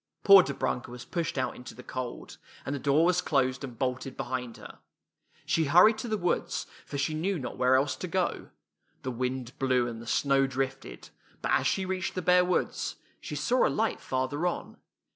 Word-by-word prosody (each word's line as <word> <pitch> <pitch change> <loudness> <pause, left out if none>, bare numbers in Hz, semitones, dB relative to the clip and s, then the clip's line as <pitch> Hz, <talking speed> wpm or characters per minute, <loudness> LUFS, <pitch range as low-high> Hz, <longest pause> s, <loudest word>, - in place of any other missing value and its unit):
" - - -51
Poor 200 -2 +10
Dobrunka 130 -4 -2
was 120 0 -9
pushed 170 -5 -3
out 130 - -1
into 125 -1 -10
the 125 - -11
cold, 125 -1 -6 0.3
and 140 - -2
the 140 - -3
door 145 +4 +3
was 180 0 +3
closed 135 -5 0
and 125 -4 -7
bolted 130 +1 -3
behind 125 -2 -4
her. - - -12 0.7
She 160 - +1
hurried 180 +9 +6
to 240 - -4
the 215 -1 0
woods, 175 -1 -1 0.2
for 140 - -5
she 140 +3 0
knew 180 +5 -1
not 135 - -5
where 130 +1 +3
else 130 0 +2
to 180 - -5
go. 180 +1 -1 0.5
The 130 - -2
wind 125 0 -3
blew 130 -2 +2
and 115 -1 -6
the 115 - -11
snow 135 +2 +2
drifted, 135 0 -4 0.3
but - - 0
as - - +3
she 190 - 0
reached 185 0 -3
the 185 - -2
bare 180 0 +5
woods, 180 0 -1 0.2
she 150 - -6
saw 195 - +2
a - - 0
light 225 +1 -1
farther 140 +6 -1
on. 175 - -4
135 Hz, 200 wpm, -29 LUFS, 130-175 Hz, 0.7 s, Poor